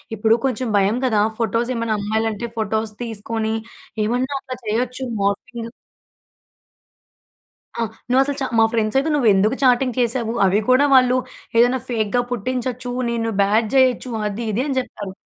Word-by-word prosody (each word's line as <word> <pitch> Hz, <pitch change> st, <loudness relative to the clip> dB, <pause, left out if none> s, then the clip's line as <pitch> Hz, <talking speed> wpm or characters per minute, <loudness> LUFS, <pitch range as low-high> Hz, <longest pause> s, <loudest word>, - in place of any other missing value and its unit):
ఇప్పుడు 220 Hz, +2 st, +3 dB
కొంచెం 255 Hz, -1 st, -1 dB
భయం 200 Hz, +4 st, +2 dB
కదా! 220 Hz, -5 st, +2 dB, 0.2 s
ఫోటోస్ 230 Hz, +2 st, 0 dB
ఏమన్నా 230 Hz, -2 st, -1 dB
అమ్మాయిలంటే 220 Hz, +2 st, -1 dB
ఫోటోస్ 220 Hz, 0 st, -1 dB
తీసుకొని, 225 Hz, 0 st, -3 dB, 0.5 s
ఏమన్నా 250 Hz, +5 st, -1 dB
అట్లా 255 Hz, -1 st, -7 dB
చేయొచ్చు 250 Hz, +4 st, -2 dB, 0.2 s
మార్ఫింగ్ 230 Hz, +4 st, -2 dB, 2.1 s
ఆ! -, -, +1 dB, 0.3 s
నువ్వసలు 270 Hz, +2 st, +3 dB
చా 265 Hz, -, 0 dB
మా 225 Hz, -, +7 dB
ఫ్రెండ్స్ 220 Hz, 0 st, 0 dB
అయితే, 295 Hz, +4 st, 0 dB
"నువ్వెందుకు 215 Hz, -4 st, +3 dB
చాటింగ్ 250 Hz, -1 st, +3 dB
చేసావు? 235 Hz, -1 st, 0 dB
అవి 195 Hz, +2 st, +3 dB
కూడా 255 Hz, +3 st, +5 dB
వాళ్ళు 255 Hz, -1 st, +5 dB, 0.4 s
ఏదైనా 245 Hz, +2 st, +4 dB
ఫేక్‌గా 230 Hz, 0 st, 0 dB
పుట్టించొచ్చు. 250 Hz, +1 st, -3 dB, 0.2 s
నిన్ను 230 Hz, -1 st, -1 dB
బ్యాడ్ 215 Hz, +3 st, +2 dB
చేయొచ్చు." 255 Hz, -1 st, +3 dB, 0.2 s
అది, 210 Hz, +3 st, -5 dB
ఇది 225 Hz, +5 st, 0 dB
అని 275 Hz, -3 st, -2 dB
చెప్తారు. 205 Hz, -6 st, -7 dB
230 Hz, 140 wpm, -21 LUFS, 220-255 Hz, 2.1 s, మా